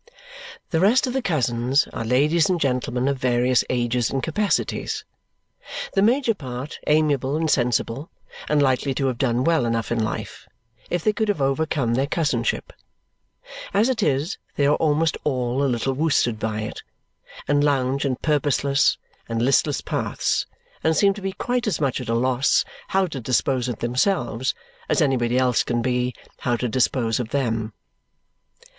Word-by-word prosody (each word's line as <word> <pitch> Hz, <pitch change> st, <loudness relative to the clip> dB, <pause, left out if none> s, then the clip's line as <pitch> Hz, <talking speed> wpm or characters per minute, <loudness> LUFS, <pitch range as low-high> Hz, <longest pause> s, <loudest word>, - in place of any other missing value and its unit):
The 165 Hz, -, +2 dB
rest 220 Hz, +10 st, +4 dB
of 250 Hz, -, -3 dB
the 265 Hz, -, 0 dB
cousins 130 Hz, -, +1 dB
are -, -, -3 dB
ladies 150 Hz, +8 st, +2 dB
and 180 Hz, -2 st, +1 dB
gentlemen 125 Hz, -2 st, 0 dB
of 140 Hz, -1 st, 0 dB
various 125 Hz, 0 st, +2 dB
ages 120 Hz, -1 st, 0 dB
and 135 Hz, -1 st, -2 dB
capacities, 200 Hz, +6 st, -1 dB, 0.9 s
the 195 Hz, -, +2 dB
major 240 Hz, +3 st, +3 dB
part 130 Hz, -, -7 dB
amiable 150 Hz, -3 st, +2 dB
and 160 Hz, 0 st, 0 dB
sensible 125 Hz, +1 st, 0 dB, 0.4 s
and 150 Hz, -1 st, +3 dB
likely 135 Hz, 0 st, +1 dB
to 135 Hz, -, 0 dB
have 130 Hz, -2 st, -1 dB
done 125 Hz, -2 st, +1 dB
well 165 Hz, -2 st, +2 dB
enough 115 Hz, -1 st, -1 dB
in 115 Hz, -2 st, +1 dB
life 110 Hz, -, -5 dB, 0.4 s
if 175 Hz, -2 st, -1 dB
they 215 Hz, -, +2 dB
could 220 Hz, +1 st, -1 dB
have 205 Hz, -6 st, 0 dB
overcome 135 Hz, -3 st, 0 dB
their 135 Hz, +3 st, +1 dB
cousinship; 145 Hz, -8 st, -1 dB, 1.0 s
as 215 Hz, +5 st, +4 dB
it 245 Hz, -3 st, 0 dB
is, 150 Hz, +1 st, 0 dB, 0.2 s
they 140 Hz, -, +2 dB
are 145 Hz, -, +4 dB
almost 155 Hz, +1 st, +1 dB
all 130 Hz, -1 st, 0 dB
a 140 Hz, -, +2 dB
little 125 Hz, +2 st, 0 dB
worsted 130 Hz, -6 st, +1 dB
by 110 Hz, -1 st, -2 dB
it, 105 Hz, -, -6 dB, 0.7 s
and 145 Hz, 0 st, +3 dB
lounge 135 Hz, -1 st, +1 dB
in 135 Hz, -3 st, 0 dB
purposeless 145 Hz, -1 st, +1 dB, 0.3 s
and 115 Hz, 0 st, -1 dB
listless 140 Hz, +2 st, +2 dB
paths, -, -, -1 dB, 0.4 s
and 160 Hz, -1 st, +2 dB
seem 200 Hz, +3 st, +4 dB
to 205 Hz, -, -9 dB
be 195 Hz, 0 st, -3 dB
quite 245 Hz, +2 st, -2 dB
as 190 Hz, -8 st, 0 dB
much 135 Hz, -4 st, 0 dB
at 125 Hz, -, -7 dB
a 115 Hz, -, +1 dB
loss 130 Hz, +3 st, +2 dB, 0.2 s
how 190 Hz, 0 st, +2 dB
to 155 Hz, -6 st, -5 dB
dispose 125 Hz, +1 st, 0 dB
of 120 Hz, -3 st, -3 dB
themselves 125 Hz, -, 0 dB, 0.3 s
as -, -, +2 dB
anybody 125 Hz, -5 st, +2 dB
else 125 Hz, -2 st, +2 dB
can 120 Hz, -1 st, -1 dB
be 125 Hz, +1 st, 0 dB, 0.3 s
how 120 Hz, -, 0 dB
to 125 Hz, +1 st, -2 dB
dispose 120 Hz, -1 st, +1 dB
of 120 Hz, -3 st, -3 dB
them. 115 Hz, -4 st, -1 dB
135 Hz, 165 wpm, -23 LUFS, 120-155 Hz, 1.0 s, rest